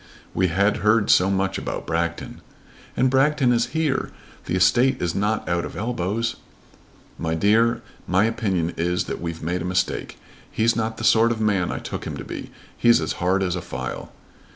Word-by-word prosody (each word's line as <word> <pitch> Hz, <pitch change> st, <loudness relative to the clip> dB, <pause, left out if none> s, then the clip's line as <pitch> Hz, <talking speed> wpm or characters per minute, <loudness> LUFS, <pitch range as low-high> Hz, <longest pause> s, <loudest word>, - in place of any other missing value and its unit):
"We 95 Hz, -, +2 dB
had 100 Hz, +4 st, +2 dB
heard 105 Hz, 0 st, +3 dB
so 95 Hz, +2 st, +5 dB
much 95 Hz, 0 st, 0 dB
about -, -, -5 dB
Bragton!" 85 Hz, 0 st, -3 dB, 0.6 s
"And 130 Hz, -, +4 dB
Bragton 135 Hz, -1 st, +3 dB
is 120 Hz, 0 st, +1 dB
here. 150 Hz, -4 st, 0 dB, 0.4 s
The 90 Hz, -, -2 dB
estate 120 Hz, +9 st, +3 dB
is 85 Hz, -1 st, -1 dB
not 105 Hz, +2 st, -1 dB
out 85 Hz, -1 st, 0 dB
of -, -, -7 dB
elbows." 110 Hz, 0 st, -2 dB, 0.8 s
"My 80 Hz, 0 st, -1 dB
dear, 115 Hz, +6 st, +3 dB, 0.2 s
my 95 Hz, +3 st, +3 dB
opinion 95 Hz, -7 st, -1 dB
is 90 Hz, +2 st, 0 dB
that -, -, -6 dB
we've 85 Hz, -2 st, -5 dB
made 90 Hz, +2 st, -1 dB
a -, -, -3 dB
mistake. 90 Hz, 0 st, -2 dB, 0.3 s
He's 115 Hz, +1 st, +1 dB
not 110 Hz, 0 st, -2 dB
the -, -, -6 dB
sort 115 Hz, +1 st, +5 dB
of 115 Hz, -, -2 dB
man 100 Hz, -5 st, +1 dB
I -, -, -3 dB
took -, -, -6 dB
him -, -, -5 dB
to -, -, -6 dB
be. -, -, -7 dB, 0.3 s
He's 120 Hz, -4 st, +4 dB
as 80 Hz, -, -2 dB
hard 95 Hz, +2 st, +2 dB
as 90 Hz, -1 st, -1 dB
a 90 Hz, -, -3 dB
file." 65 Hz, -4 st, -6 dB
100 Hz, 185 wpm, -23 LUFS, 90-115 Hz, 0.8 s, so